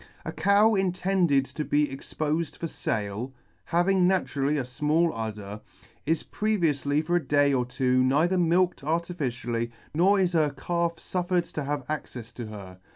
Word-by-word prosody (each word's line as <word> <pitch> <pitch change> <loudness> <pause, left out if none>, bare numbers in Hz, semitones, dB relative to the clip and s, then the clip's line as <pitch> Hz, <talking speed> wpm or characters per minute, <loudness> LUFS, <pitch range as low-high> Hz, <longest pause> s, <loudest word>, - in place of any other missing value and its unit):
A - - -3
cow 205 +3 +4
intended 185 -6 +2
to 150 - -5
be 150 0 +2
expofed 155 +3 -3
for - - -4
fale, 110 -1 -3 0.3
having 180 +2 +3
naturally 150 -6 +1
a 135 - 0
fmall 150 +7 +1
udder, 105 -2 -6 0.5
is 160 0 +1
previoufly 155 -8 0
for 175 +2 +2
a 175 - -2
day 145 -1 +3
or 125 -2 +1
two 130 0 +1
neither 155 +8 +2
milked 175 -2 +2
artificially, 130 -8 -2 0.2
nor 190 +6 +4
is 185 -2 +1
her 155 -3 +3
calf 170 +4 -2
fuffered 180 0 -2
to 150 - -3
have 145 -2 -3
accefs 125 -6 -6
to 120 -3 -6
her. 95 -4 -10
150 Hz, 155 wpm, -27 LUFS, 130-175 Hz, 0.5 s, cow